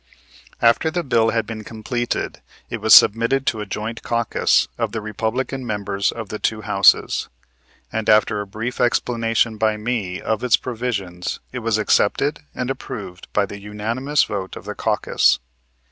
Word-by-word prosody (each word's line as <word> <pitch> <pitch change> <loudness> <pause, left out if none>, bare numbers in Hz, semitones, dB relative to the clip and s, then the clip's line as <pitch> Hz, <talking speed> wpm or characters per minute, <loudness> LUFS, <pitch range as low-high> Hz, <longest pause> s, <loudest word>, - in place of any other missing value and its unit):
After 115 +7 +4
the 175 +1 -2
bill 115 -5 +2
had 115 -1 0
been 110 -1 -6
completed, 120 +3 -3 0.3
it 115 - -4
was 110 +1 0
submitted 115 +5 +5
to 110 - 0
a 105 - -6
joint 110 +3 -4
caucus 115 -1 +1
of - - -2
the 110 - -2
Republican 115 +5 -3
members 100 -4 -1
of 115 -3 -7
the 105 - -5
two 110 -1 -1
Houses, 100 -2 +3 0.6
and 110 -1 -1
after 105 -1 +4
a 100 - -7
brief 115 +6 -4
explanation 115 -2 +1
by 110 0 +2
me 105 -5 -2
of 110 +1 -2
its 125 -2 +4
provisions 110 -8 -4
it 130 - -4
was 115 -2 0
accepted 135 +7 +2 0.2
and 125 +1 -2
approved 100 -8 -8
by 105 - +2
the 100 +1 -9
unanimous 115 +8 0
vote 95 -2 -4
of - - -10
the - - -4
caucus. - - +2
110 Hz, 160 wpm, -21 LUFS, 105-120 Hz, 0.6 s, submitted